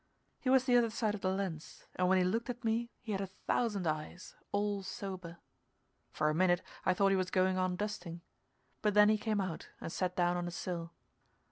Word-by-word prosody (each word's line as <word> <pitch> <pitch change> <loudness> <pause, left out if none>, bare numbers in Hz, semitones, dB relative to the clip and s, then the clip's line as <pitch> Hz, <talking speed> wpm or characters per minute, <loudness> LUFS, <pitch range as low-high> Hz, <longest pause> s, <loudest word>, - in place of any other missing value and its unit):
He 255 - -1
was 260 -1 +6
the 250 -2 +3
other 235 -1 +4
side 215 -1 0
of 205 - -5
the 185 - +1
lens, 190 -5 -4
and 180 0 +2
when 190 - +5
he 185 - +4
looked 225 +7 0
at 245 0 -5
me 230 +1 0
he 220 - -5
had 195 -1 -1
a 195 - -2
thousand 200 +1 -1
eyes, 155 +3 -3 0.2
all 205 0 0
sober. 185 -3 -6 0.7
For 155 - 0
a 155 - +2
minute 175 +1 +3 0.2
I 185 - +4
thought 195 +1 +4
he - - +4
was 185 -1 0
going 185 0 +2
on 185 -1 +1
dusting, 180 -4 -4 0.6
but 210 -1 +1
then 210 0 +8
he 215 - +4
came 215 -1 0
out 185 -5 -3
and - - -5
sat 180 0 -1
down 175 0 +2
on 175 0 -2
a - - -4
sill. 170 -1 -4
190 Hz, 220 wpm, -34 LUFS, 175-210 Hz, 0.7 s, then